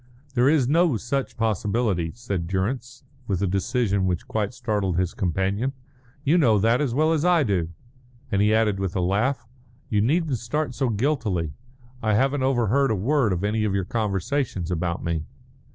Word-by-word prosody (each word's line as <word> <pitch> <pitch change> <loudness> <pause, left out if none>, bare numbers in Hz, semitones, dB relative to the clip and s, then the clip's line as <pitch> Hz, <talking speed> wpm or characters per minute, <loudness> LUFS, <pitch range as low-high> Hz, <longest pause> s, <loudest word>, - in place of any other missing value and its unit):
"There 125 +1 +4
is 145 -5 +3
no 160 -2 +3
such 135 +5 -3
possibility," 105 -5 0
said 100 -8 -3
Durrance, 120 +7 -3 0.2
with 95 -4 0
a - - +3
decision 100 +1 0
which 90 -2 -2
quite 105 -2 -1
startled 105 -7 -1
his 90 -1 0
companion. 95 +7 -1 0.5
"You 155 +5 +3
know 115 -9 +4
that 115 +5 +3
as 130 -5 -1
well 155 +3 +3
as 155 -2 0
I 175 -3 +4
do;" 95 -8 0 0.6
and 100 - +2
he 105 +1 +4
added 110 -3 +2
with 95 -2 -2
a - - +1
laugh, 110 +9 0 0.4
"You 105 -1 +2
needn't 145 +1 +1
start 130 +3 -2
so 125 +2 0
guiltily. 105 - -1 0.5
I 110 -2 +1
haven't 135 +4 +2
overheard 130 +1 +2
a 110 - +1
word 120 +3 +1
of 90 +1 -1
any 105 +1 0
of 100 -2 0
your 95 -2 0
conversations 100 - -1
about 85 0 -2
me." 85 -2 -1
110 Hz, 175 wpm, -24 LUFS, 95-130 Hz, 0.6 s, There